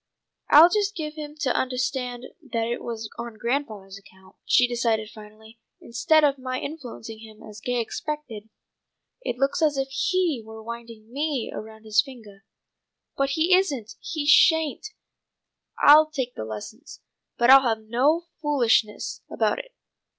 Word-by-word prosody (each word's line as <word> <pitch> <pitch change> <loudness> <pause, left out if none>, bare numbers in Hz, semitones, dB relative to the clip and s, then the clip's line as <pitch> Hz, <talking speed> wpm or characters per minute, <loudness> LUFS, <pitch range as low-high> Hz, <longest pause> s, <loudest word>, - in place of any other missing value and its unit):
"I'll 325 +4 +8
just 415 0 0
give 305 -3 -5
him 300 -1 -8
to 260 -4 +1
undahstand 255 -1 -2 0.3
that 230 -1 0
it 235 +1 -3
was 225 -2 -5
on 235 -2 -7
grandfathah's 215 -6 -3
account," 190 -1 -21
she 245 - +4
decided 230 -3 -1
finally. 220 +1 -15 0.2
"Instead 270 +7 +2
of 280 -2 +2
my 255 0 -4
influencing 245 -7 -8
him 220 -1 -14
as 215 -1 -11
Gay 245 -1 -1
expected, 230 -3 -5 0.7
it 245 - -4
looks 275 +4 0
as 300 -3 +2
if 270 0 -1
he 330 0 0
were 220 0 -11
winding 230 -1 -10
me 285 -4 -2
around 220 0 -9
his 215 -2 +3
fingah. 220 -7 -13 0.8
But 275 0 0
he 340 +3 +4
isn't! 275 - -1
He 310 -3 -4
sha'n't! 320 +3 +4 0.9
I'll 305 +1 +7
take 260 -5 -4
the - - -6
lessons, 110 - -9 0.4
but 240 +2 +5
I'll 270 0 +9
have 225 -4 -1
no 275 +10 +1 0.2
foolishness 240 -7 +1
about - - 0
it. - - -11
245 Hz, 150 wpm, -24 LUFS, 220-295 Hz, 0.9 s, I'll